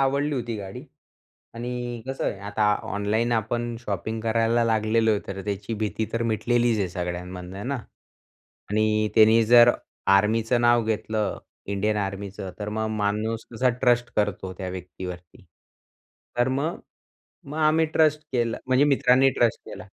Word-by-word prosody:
आवडली 140 +2 +1
होती 120 -3 -3
गाडी 95 -2 -8 0.7
आणि 120 0 -5
कसं 135 0 -3
आहे 100 - -2
आता 105 0 +2 0.2
ऑनलाईन 110 +4 0
आपण 120 +1 -1
शॉपिंग 110 0 -3
करायला 115 +1 +2
लागलेलो 110 0 +2
आहे, 105 - +1
तर 95 0 -5
त्याची 105 +2 -3
भीती 110 0 -2
तर 115 - 0
मिटलेलीच 115 0 +1
आहे 95 - 0
सगळ्यांमधनं 90 +1 -5
आहे 100 - -6
ना 140 +1 -1 0.9
आणि 110 0 +2
त्यानी 110 +1 +6
जर 120 +1 +8 0.5
आर्मीचं 115 +4 +2
नाव 120 -1 +4
घेतलं, 110 -1 -1 0.3
इंडियन 105 +2 0
आर्मीचं 100 -1 -4
तर 105 0 -4
मग 110 +1 -2
माणूस 110 +2 -1
कसा 125 +3 +2
ट्रस्ट 120 -2 +2
करतो 100 -3 -1
त्या 95 -2 -4
व्यक्तीवरती. 90 -1 -8 0.9
तर 120 +1 +3
मग 140 +6 -1 0.7
मग 150 +3 -7
आम्ही 160 +1 +3
ट्रस्ट 155 -1 +3
केलं 120 -2 0
म्हणजे 130 +2 +4
मित्रांनी 135 -1 +4
ट्रस्ट 120 -2 +2
केला. - - -9
110 Hz, 145 wpm, -25 LUFS, 105-120 Hz, 0.9 s, जर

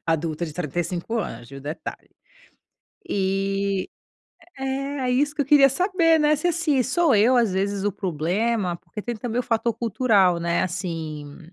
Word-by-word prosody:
adulta 165 0 -1
de 155 - -7
35 175 - -3
anos, 120 - -5
viu, 135 0 -9
detalhe. 150 +4 -7 1.0
E 195 0 -1 0.7
é 270 +1 -3
é - - +1
isso 285 +4 +2
que - - -1
eu - - -5
queria 280 -1 +7
saber, 335 +2 +2
né, 300 0 +4
se 305 +4 0
assim 320 -6 +1
sou 295 +4 +2
eu 225 +5 +5
às 230 -5 +3
vezes 195 +1 -1
o 205 - +1
problema, 185 +3 -1
porque 210 - -9
tem 240 +3 -4
também 235 +1 -3
o - - -2
fator 230 0 0
cultural, 210 -6 +2
né, 170 0 +1
assim, 160 -5 -5
205 Hz, 160 wpm, -24 LUFS, 170-260 Hz, 1.0 s, queria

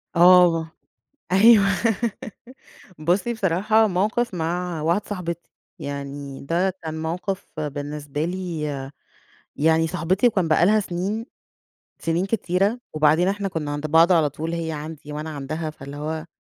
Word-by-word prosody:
آه، 170 -2 +6 0.6
أيوه 210 +1 +7 1.3
بُصي 180 +9 +1
بصراحة 210 +2 +2
موقف 210 +4 0
مع 175 0 -2
واحدة 170 +6 +1
صاحبتي، 170 -4 -5 0.3
يعني 140 -1 -6
ده 175 +6 +1
كان 160 -1 -5
موقف 180 +1 -4
بالنسبة 145 0 -4
لي 175 -2 -4 0.9
يعني 160 +2 +3
صاحبتي 180 +8 +1
وكان 190 -8 +2
بقى 160 +2 +4
لها 215 +2 +4
سنين 200 +5 -3 0.7
سنين 165 +3 0
كتيرة. 200 +2 0
وبعدين 155 +3 +3
إحنا 200 0 -1
كنا 160 -5 -4
عند 145 +1 -3
بعض 165 +4 +5
على 160 -4 +3
طول 160 +3 -5
هي 165 -1 -3
عندي 150 0 -7
وأنا 150 +2 -5
عندها، 155 +2 -4
فاللي 140 -1 -10
هو 155 +2 -4
165 Hz, 130 wpm, -23 LUFS, 155-190 Hz, 1.3 s, أيوه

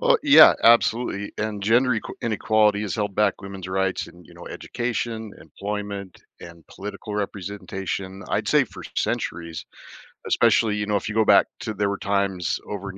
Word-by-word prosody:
Uh, - - +4
yeah, 285 -1 +8
absolutely, 115 -3 +3
and 105 -2 -3
gender 120 +5 +3
equa 110 -3 -2
inequality 110 -2 +2
has 105 - -3
held 105 -3 -2
back 105 -2 +1
women's 95 -2 -8
rights, 95 0 -1
and, 85 -1 -17
you - - -17
know, - - -11
education, 115 -3 -4
employment, 100 -2 -6 0.2
and 85 -1 -13
political 105 +1 -8
representation, 95 -1 -5
I'd - - -1
say, - - +4
for - - -12
centuries. 85 -1 -3 0.6
Especially, 110 -2 +3
you 105 0 -2
know, 105 0 +1
if 100 - -5
you 105 - -5
go 110 - +3
back - - +6
to 110 - -4
there 100 0 0
were 100 - -2
times 100 -4 -1
over 100 -1 -5
in 95 - -13
100 Hz, 170 wpm, -23 LUFS, 95-110 Hz, 0.6 s, yeah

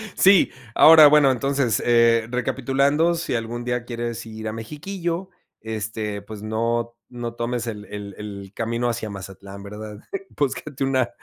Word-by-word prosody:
Sí, 195 0 +5 0.2
ahora, 155 -1 +9
bueno, 145 -2 +6
entonces, 130 -3 0
eh 115 -1 +4
recapitulando, 135 +6 +1
si 165 -6 -2
algún 115 +1 -3
día 125 -1 -2
quieres 120 -1 -4
ir 110 0 -7
a 110 - -3
Mexiquillo, 170 - -4 0.3
este, 105 -1 -4
pues, 105 +1 -9
no 115 +2 -1 0.2
no 120 -1 -5
tomes 120 0 -3
el 105 -3 -6
el 100 -1 -7
el 100 -2 -8
camino 115 +2 -1
hacia 115 -2 -2
Mazatlán, 100 0 -9
¿verdad? 105 +1 -8 0.4
Búscate 140 0 -2
una 130 -2 +1
120 Hz, 145 wpm, -23 LUFS, 110-135 Hz, 0.4 s, ahora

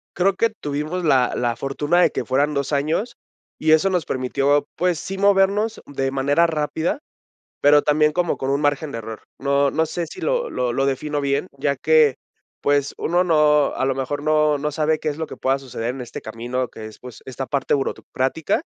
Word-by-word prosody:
Creo 190 +2 +2
que 230 +4 +2
tuvimos 155 -2 -4
la 130 -5 +3
la 120 -1 0
fortuna 145 +7 0
de - - +5
que - - -3
fueran 140 +3 +1
2 140 +1 -2
años, 160 +12 0 0.4
y 155 0 +1
eso 160 +5 +5
nos 180 -5 0
permitió, 140 +3 +1
pues, 175 -2 0
sí 195 0 -5
movernos 200 +2 +2
de 135 -1 -2
manera 145 +5 +2
rápida, 160 - -1 0.6
pero 145 +1 +6
también 150 +1 +2
como 175 0 0
con 135 - -3
un 140 +2 +1
margen 145 0 0
de 115 - -3
error. 110 0 -8 0.2
No 140 0 +2
no 160 0 +1
sé 170 +2 -3
si - - -10
lo - - 0
lo 125 -1 -1
lo 135 +3 0
defino 145 +2 -1
bien, 140 +5 0
ya 140 +1 0
que, 150 0 +4 0.5
pues, 145 -1 +1
uno 175 +2 +1
no, 150 -3 +3
a - - -2
lo 135 - +1
mejor, 135 +2 -3
no 155 -1 +3
no 150 +1 -2
sabe 155 +1 0
qué 155 - -1
es 145 - -5
lo 160 -1 -3
que - - -8
pueda 135 +1 0
suceder 120 -3 -5
en - - -8
este 120 - -8
camino, 120 +3 -4
que 110 - -9
es, 110 - -11
pues, 125 -3 -11
esta 130 +1 -5
parte 140 -1 -1
burocrática. 135 - -1
145 Hz, 205 wpm, -22 LUFS, 135-160 Hz, 0.6 s, pero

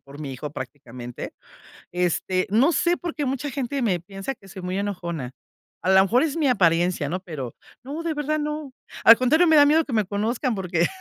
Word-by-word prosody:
por 140 +2 -12
mi 140 -3 -5
hijo 145 +3 -6
prácticamente, 125 -3 -8 0.6
este, 180 +1 0
no 245 - +4
sé 345 +1 +2
por 345 -2 -5
qué 295 - -2
mucha 270 +2 -2
gente 270 +1 -3
me 190 -7 +1
piensa 195 +8 -6
que 195 - -18
soy 190 -1 -9
muy 180 +1 -3
enojona. 170 -9 -4 0.5
A - - -1
la 190 0 +7
mejor 235 +8 +3
es 315 -2 -1
mi 315 -4 +1
apariencia, 175 - +2
¿no? 180 +4 -2
Pero 150 -10 -7 0.3
no, 285 +5 -5
de 335 -1 -1
verdad 300 +1 -1
no, 300 -2 -4 0.3
al 230 - +10
contrario, 310 +8 +4
me 320 - +5
da 290 -1 +8
miedo 315 +2 +4
que 270 - -6
me 215 -2 +3
conozcan, 225 +5 -1
porque 175 -3 0
205 Hz, 205 wpm, -24 LUFS, 175-285 Hz, 0.6 s, al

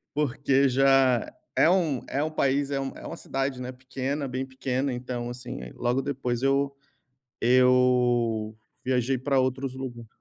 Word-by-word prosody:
Porque 140 -1 +2
já 130 -2 +3 0.3
é - - +5
um 165 -9 +2
é 140 - -1
um 155 - -2
país 140 -2 +1
é 140 - -1
um 135 0 -4
é - - -9
uma - - -6
cidade, 135 -1 -3
né, 125 0 -5
pequena 135 +2 -4
bem 130 +1 -3
pequena, 130 0 -2
então, 120 -1 -4
assim, 120 - -7
aí, - - -9
logo 120 +2 0
depois 130 -3 -2
eu 140 +1 +2 0.7
eu 125 -3 +3 0.3
viajei 130 0 +1
pra 135 +1 +1
outros 130 0 -1
lugar. 120 -3 -7
130 Hz, 160 wpm, -26 LUFS, 125-135 Hz, 0.7 s, é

